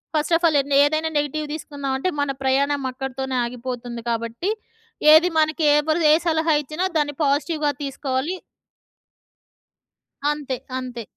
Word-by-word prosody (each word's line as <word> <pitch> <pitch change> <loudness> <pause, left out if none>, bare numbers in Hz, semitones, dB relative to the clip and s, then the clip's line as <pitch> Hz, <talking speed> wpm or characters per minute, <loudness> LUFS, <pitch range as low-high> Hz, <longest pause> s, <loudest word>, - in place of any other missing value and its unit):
First 305 +2 +1
of 340 - 0
all 300 - +2 0.3
ఏదైనా 310 +2 +1
negative 295 +1 -1
తీసుకున్నామంటే 280 0 -3
మన 285 -1 0
ప్రయాణం 275 +1 +1
అక్కడితోనే 265 0 -4
ఆగిపోతుంది. 245 -1 -6
కాబట్టి, 230 - -2 0.6
ఏది 340 +3 +5
మనకి 315 +1 0
ఎవరు 310 +3 +1
ఏ - - +7
సలహా 320 -1 +2
ఇచ్చినా 305 +6 -3
దాన్ని 290 -1 -1
పాజిటివ్‍గా 295 +2 +1
తీసుకోవాలి. 275 +4 -2 1.9
అంతే. 290 -3 -2 0.2
అంతే. 250 -2 -6
285 Hz, 120 wpm, -22 LUFS, 260-310 Hz, 1.9 s, ఏ